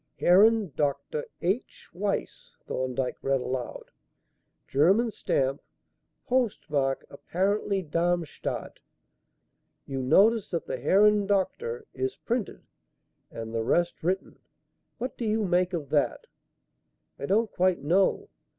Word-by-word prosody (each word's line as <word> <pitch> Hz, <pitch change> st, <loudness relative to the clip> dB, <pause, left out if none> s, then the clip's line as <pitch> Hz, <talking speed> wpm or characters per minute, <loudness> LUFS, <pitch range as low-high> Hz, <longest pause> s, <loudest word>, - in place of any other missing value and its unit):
"Herrn 205 Hz, +1 st, +5 dB
Dr. 145 Hz, +1 st, -1 dB, 0.2 s
H. 195 Hz, +8 st, -2 dB
Weiss," 200 Hz, +2 st, -3 dB
Thorndyke 130 Hz, 0 st, -2 dB
read 135 Hz, 0 st, +1 dB
aloud. 125 Hz, -1 st, -5 dB, 0.8 s
"German 195 Hz, -, +3 dB
stamp, 135 Hz, -7 st, -1 dB, 0.6 s
postmark 155 Hz, -, 0 dB
apparently 195 Hz, +5 st, -1 dB
Darmstadt. 170 Hz, 0 st, -2 dB, 1.1 s
You 135 Hz, -1 st, -3 dB
notice 205 Hz, -, +4 dB
that 170 Hz, -3 st, -3 dB
the 130 Hz, -, -4 dB
'Herrn 205 Hz, +6 st, +4 dB
Dr.' 435 Hz, -, -1 dB
is 390 Hz, 0 st, -2 dB
printed 235 Hz, -3 st, -3 dB, 0.7 s
and 115 Hz, 0 st, -7 dB
the 115 Hz, -, 0 dB
rest 175 Hz, +11 st, +1 dB
written. 185 Hz, +3 st, -2 dB, 0.6 s
What 255 Hz, +1 st, -5 dB
do 235 Hz, -, -2 dB
you 215 Hz, 0 st, +1 dB
make 180 Hz, 0 st, +2 dB
of 160 Hz, -6 st, -4 dB
that?" 145 Hz, -2 st, +1 dB, 0.9 s
"I 140 Hz, -, -4 dB
don't 215 Hz, +2 st, +2 dB
quite 185 Hz, -2 st, +1 dB
know. 180 Hz, +6 st, +2 dB
180 Hz, 110 wpm, -27 LUFS, 140-210 Hz, 1.1 s, Herrn